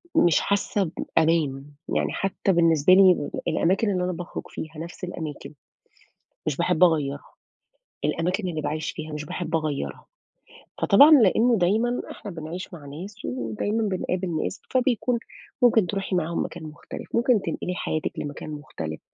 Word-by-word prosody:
مش 170 Hz, -3 st, +5 dB
حاسة 200 Hz, -3 st, 0 dB, 0.3 s
بأمان، 150 Hz, -4 st, +2 dB, 0.3 s
يعني -, -, +1 dB
حتى 195 Hz, 0 st, 0 dB
بالنسبة 165 Hz, 0 st, +4 dB
لي 185 Hz, -5 st, +5 dB, 0.2 s
الأماكن 195 Hz, +5 st, +2 dB
اللي 180 Hz, -2 st, 0 dB
أنا 180 Hz, -, -1 dB
باخرُج 175 Hz, +1 st, -6 dB
فيها 160 Hz, 0 st, -7 dB
نَفس 170 Hz, +2 st, -8 dB
الأماكن، 160 Hz, -4 st, -6 dB, 0.9 s
مش 145 Hz, -3 st, 0 dB
باحب 175 Hz, 0 st, +2 dB
أغيرها. 145 Hz, -5 st, +2 dB, 0.8 s
الأماكن 185 Hz, +3 st, 0 dB
اللي 160 Hz, -3 st, -3 dB
باعيش 155 Hz, +1 st, -2 dB
فيها 155 Hz, -1 st, -7 dB
مش 150 Hz, 0 st, -5 dB
باحب 165 Hz, -1 st, -2 dB
أغَيَّرها. 155 Hz, -3 st, -3 dB, 0.8 s
فطبعًا 280 Hz, +10 st, +7 dB
لإنه 235 Hz, -3 st, +5 dB
دايمًا 220 Hz, +7 st, +1 dB
إحنا 205 Hz, -, -8 dB
بنعيش 170 Hz, +3 st, -7 dB
مع 155 Hz, -4 st, -10 dB
ناس 185 Hz, +9 st, -8 dB
ودايمًا 125 Hz, -, -2 dB
بنقابل 185 Hz, -4 st, -1 dB
ناس، -, -, -4 dB
فبيكون 250 Hz, -2 st, +1 dB, 0.4 s
ممكن 220 Hz, -6 st, +5 dB
تِرُوحي 195 Hz, -1 st, -2 dB
معاهم 170 Hz, -1 st, 0 dB
مكان 170 Hz, -1 st, -8 dB
مختلف، 155 Hz, -1 st, -9 dB
ممكن 235 Hz, -2 st, +3 dB
تنقلي 180 Hz, -, -3 dB
حياتِك 155 Hz, -3 st, -2 dB
لمكان 145 Hz, +1 st, -6 dB
مختلف، 80 Hz, -, -6 dB
175 Hz, 140 wpm, -25 LUFS, 155-200 Hz, 0.9 s, فطبعًا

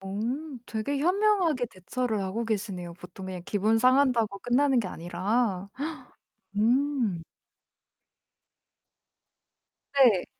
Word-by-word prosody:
오 195 Hz, +2 st, -5 dB, 0.5 s
되게 235 Hz, +6 st, -2 dB
현명하게 360 Hz, -5 st, +2 dB
대처를 220 Hz, +3 st, -3 dB
하고 195 Hz, +5 st, -2 dB
계시네요. 195 Hz, -6 st, -3 dB
보통 180 Hz, +2 st, -10 dB
그냥 185 Hz, -2 st, -6 dB
기분 215 Hz, +3 st, +2 dB
상한다고 250 Hz, -5 st, +3 dB
끝나는 260 Hz, +3 st, +2 dB
게 220 Hz, -, 0 dB
아니라. 185 Hz, +4 st, -1 dB, 0.9 s
음. 235 Hz, -, +1 dB, 2.7 s
네. 245 Hz, -9 st, +5 dB
220 Hz, 200 characters per minute, -28 LUFS, 190-255 Hz, 2.7 s, 네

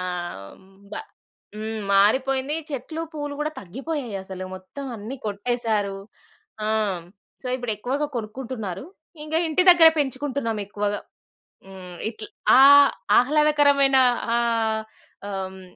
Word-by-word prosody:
ఆ! -, -, -3 dB, 0.6 s
హ్మ్. 190 Hz, -, -21 dB, 0.3 s
బ -, -, -4 dB, 0.6 s
హ్మ్. 220 Hz, +1 st, -4 dB
మారిపోయిందీ, 265 Hz, +8 st, +2 dB
చెట్లు 305 Hz, +4 st, -5 dB
పూలు 290 Hz, -2 st, -5 dB
గూడా 300 Hz, +1 st, -1 dB
తగ్గిపోయాయసలు, 200 Hz, -, -5 dB
మొత్తం 185 Hz, +10 st, -9 dB
అన్ని 220 Hz, +6 st, -7 dB
కొట్టేసారు. 210 Hz, -1 st, -1 dB, 0.7 s
ఆ! -, -, -1 dB
హ్మ్. 210 Hz, -5 st, 0 dB, 0.4 s
సో, -, -, -7 dB
ఇప్పుడెక్కువగా 245 Hz, +4 st, -2 dB
కొనుక్కుంటున్నారు. 220 Hz, -4 st, -5 dB, 0.4 s
ఇంకా 315 Hz, +1 st, 0 dB
ఇంటి 320 Hz, +3 st, +2 dB
దగ్గర 340 Hz, -2 st, +8 dB
పెంచుకుంటున్నాం 265 Hz, -4 st, -2 dB
ఎక్కువగా. 205 Hz, 0 st, -2 dB, 0.7 s
హ్మ్. 185 Hz, -2 st, -11 dB
ఇట్ల్ 220 Hz, -1 st, -8 dB, 0.3 s
ఆహ్, 280 Hz, +1 st, +8 dB, 0.3 s
ఆహ్లాదకరమైన 285 Hz, 0 st, +4 dB, 0.4 s
ఆహ్, 225 Hz, -2 st, +1 dB, 0.5 s
ఆహ్, 195 Hz, -1 st, -3 dB, 0.2 s
హ్మ్. 190 Hz, -, -12 dB
235 Hz, 110 wpm, -24 LUFS, 205-280 Hz, 0.7 s, దగ్గర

